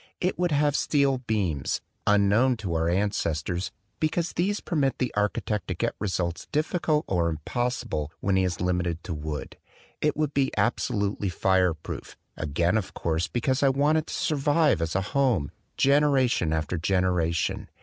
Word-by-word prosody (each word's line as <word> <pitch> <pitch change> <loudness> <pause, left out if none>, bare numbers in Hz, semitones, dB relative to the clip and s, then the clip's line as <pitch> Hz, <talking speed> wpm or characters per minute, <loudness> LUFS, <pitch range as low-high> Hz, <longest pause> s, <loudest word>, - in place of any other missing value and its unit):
It 180 0 -1
would 180 -2 +1
have 145 -1 +2
steel 140 -4 +2
beams, 100 - -1 0.3
un 105 -1 +5
known 120 +5 +3
to 95 -6 -4
our 80 0 +1
ancestors, 90 -2 -1 0.3
because 165 +2 0
these 200 +5 0
permit 140 -6 0
the 125 - -1
architect 105 0 -1
to - - -2
get - - -1
results 90 -4 -2
difficult 155 0 +1
or 85 -3 +1
impos 120 +11 -2
sible 75 -1 -2
when 100 0 +1
he 95 - +3
is 90 -3 -1
limited 90 -2 -1
to 90 - -4
wood. 75 -1 -5 0.4
It 150 -1 +1
would 155 -2 0
be 135 -1 +2
absolutely 105 -4 0
fireproof, 90 -2 0 0.2
again 85 +6 0
of 95 - -8
course, 80 0 -1
because 130 +2 0
I 140 - +5
want 145 +4 +3
it 155 - -6
to - - -6
survive 150 - +2
as 80 0 -2
a 95 - +2
home, 125 - +2 0.3
generation 135 - +3
after 80 +2 -1
generation. 90 -2 0
105 Hz, 160 wpm, -26 LUFS, 85-140 Hz, 0.4 s, un